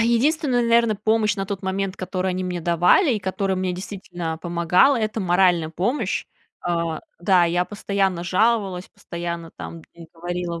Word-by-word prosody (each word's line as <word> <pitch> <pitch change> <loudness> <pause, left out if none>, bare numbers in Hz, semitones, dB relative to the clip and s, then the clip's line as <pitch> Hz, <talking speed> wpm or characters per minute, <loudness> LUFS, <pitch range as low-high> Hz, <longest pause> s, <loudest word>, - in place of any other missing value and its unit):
А - - +4
единственная, 250 +2 +2
наверное, 235 -1 +3
помощь 215 0 +2
на 195 - -2
тот 200 -1 -5
момент, 190 0 -2
которую 185 0 -2
они 185 0 -2
мне 180 -1 -3
давали 175 - +4
и - - -1
которая 190 0 -1
мне 185 -1 -1
действительно 180 -3 -5
помогала,- 175 - +3
это 215 -1 -1
моральная 175 -2 +3
помощь 215 - -1 0.4
э, - - +1 0.5
да, 175 0 +4
я 175 +1 +1
постоянно 195 -2 -1
жаловалась, 195 -1 +1
постоянно 170 -1 -6
там 165 -1 -8
им 170 -1 -13
говорила: 175 0 -4
185 Hz, 160 wpm, -23 LUFS, 175-210 Hz, 0.5 s, А